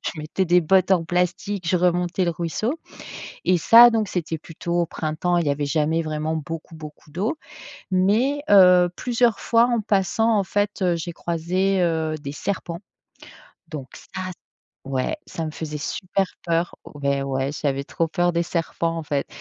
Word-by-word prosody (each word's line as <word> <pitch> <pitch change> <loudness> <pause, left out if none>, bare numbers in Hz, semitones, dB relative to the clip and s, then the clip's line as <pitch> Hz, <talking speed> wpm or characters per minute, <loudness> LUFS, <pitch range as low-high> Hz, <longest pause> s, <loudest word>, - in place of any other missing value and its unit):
Je - - -2
je 155 - -7
mettais 155 +5 -1
des 180 0 +4
bottes 185 +3 +3
en 170 -3 +2
plastique, 180 +2 -1
je 185 - +3
remontais 175 +1 +1
le 170 - +1
ruisseau. 170 - -2 0.7
Et 180 -1 +3
ça, 235 +8 +8
donc 220 -3 0
c'était 165 -2 -3
plutôt 165 +2 -6
au 170 - +1
printemps. 160 +3 -1
Il 170 - 0
y - - +2
avait 145 +1 -1
jamais 155 +3 +1
vraiment 155 0 -2
beaucoup, 160 +2 -6
beaucoup 150 -1 -11
d'eau. 205 - -2 0.6
Mais 215 +10 +2
heu, 180 -3 +7
plusieurs 240 -2 +1
fois, 230 0 +4
en 235 -2 +1
passant, 215 +2 +1
en 200 - +2
fait, 205 +2 0
heu, 180 -2 +2
j'ai 170 +1 -4
croisé, 180 +3 0
heu, 160 -2 0
des 140 - -5
serpents. 170 +2 -4 0.9
Donc 145 -5 -7
ça - - -8 0.6
ouais, 135 - -2
ça 165 - -4
me - - -4
faisait 150 -1 -5
super 190 +6 -1 0.2
peur. 170 0 0 0.2
Ouais, 140 -1 -1
ouais, 135 0 -1
j'avais 140 -2 -2
trop 165 +3 -2
peur 175 +2 +1
des 170 0 +1
serpents, 165 0 -2
en 165 - -3
fait. 145 -2 -2
170 Hz, 175 wpm, -23 LUFS, 155-190 Hz, 0.9 s, ça